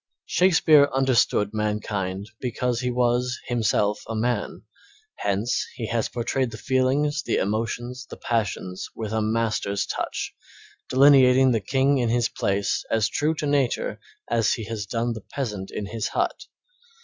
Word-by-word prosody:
Shakespeare 160 -5 +5
understood 125 -6 +2
mankind 105 -2 -2
because 125 -1 -1
he 125 - -1
was 125 0 +1
himself 105 -3 +1
a 115 - -4
man; 120 +3 -2 0.5
hence 100 +5 0
he 115 - -4
has 115 -1 0
portrayed 125 +1 -1
the 110 - -8
feelings, 140 +4 +1
the - - -1
emotions, 115 +5 -2
the - - -9
passions 105 -5 -2
with 110 -1 -4
a 110 - +1
master's 110 -2 0
touch, - - -3 0.6
delineating 130 -1 +6
the 115 -3 +1
king 135 +4 +2
in 120 -2 +1
his 120 0 +1
palace 100 +1 -1
as 110 -2 +2
true 155 +2 0
to 150 - -3
nature 140 -4 0 0.3
as 115 -2 +2
he 115 - -4
has 110 -2 -5
done 115 +3 -1
the 110 - -7
peasant 105 -6 -5
in 105 - -4
his 110 +2 -3
hut. - - -2
115 Hz, 150 wpm, -24 LUFS, 105-130 Hz, 0.6 s, delineating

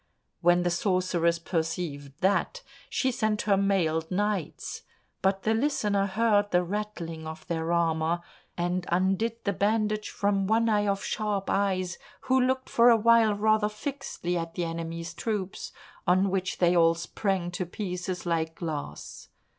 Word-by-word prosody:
When 175 +1 +4
the 175 - +1
sorceress 175 -2 +1
perceived 160 -4 -3
that, 200 - +1 0.3
she 260 - +1
sent 215 -3 0
her 205 -2 +3
mailed 175 -5 +1
knights; 200 -3 -2 0.4
but 190 0 +1
the 220 - +2
Listener 210 -6 +1
heard 205 0 +2
the 180 -1 +3
rattling 175 -5 -4
of 160 0 -8
their 165 0 -2
armour, 165 0 +1 0.4
and 175 +1 -1
undid 195 +6 +1
the 200 - 0
bandage 215 +1 0
from 200 -1 0
one 225 +2 +3
eye 205 -1 +2
of 195 0 0
Sharp 210 -2 -2
eyes, 185 -3 0 0.2
who 260 0 +2
looked 260 +1 0
for 235 +1 +5
a 230 - +6
while 225 -1 +5
rather 215 0 +2
fixedly 210 -6 -4
at 165 0 -6
the 175 - -1
enemy's 165 0 -4
troops, 205 -4 -3 0.4
on 185 +2 +3
which 190 -1 -1
they 175 0 +3
all 165 -1 +5
sprang 175 +1 -2
to 175 0 -3
pieces 180 -1 -4
like 165 -1 -1
glass. 150 - -6
190 Hz, 150 wpm, -28 LUFS, 170-210 Hz, 0.4 s, a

